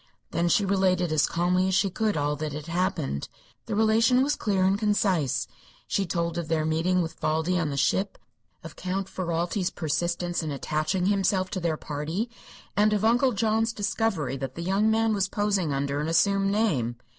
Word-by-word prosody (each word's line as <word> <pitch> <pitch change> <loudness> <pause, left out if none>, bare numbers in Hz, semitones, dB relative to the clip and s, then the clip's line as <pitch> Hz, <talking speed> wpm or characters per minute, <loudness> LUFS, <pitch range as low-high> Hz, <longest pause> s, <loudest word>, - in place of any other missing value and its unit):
Then 170 +1 +1
she 205 +1 +3
related 185 -3 +1
as 155 -2 +3
calmly 180 +2 +1
as 190 - +1
she 195 0 +2
could 215 -1 0
all 145 0 0
that 150 0 -4
had 150 0 -6
happened. 165 - -2 0.4
The - - -2
relation 225 +4 +4
was 290 +2 +1
clear 195 -3 0
and 190 +1 +3
concise. 200 - +1 0.4
She 195 -2 0
told 170 -1 -1
of 170 - -4
their 155 -1 0
meeting 170 +3 +1
with 165 - -7
Valdi 160 +4 0
on 160 -3 -1
the 140 - -4
ship, 190 +7 +1 0.5
of 165 - -9
Count 190 +1 -3
Ferralti's 175 +1 -2
persistence 175 +3 -2
in 160 - -4
attaching 155 +6 -1
himself 190 -1 +1
to 190 - -2
their 165 -3 -1
party, 160 +12 -4 0.4
and 210 +2 +3
of 210 0 +1
Uncle 245 +3 +3
John's 225 +1 +1
discovery 200 - -1
that 130 -1 -5
the 170 - -5
young 195 +4 +2
man 225 0 +2
was 195 -2 0
posing 200 -7 0
under 140 +1 -1
an 150 - -2
assumed 195 +4 +2
name. 160 - 0
185 Hz, 185 wpm, -26 LUFS, 160-205 Hz, 0.5 s, relation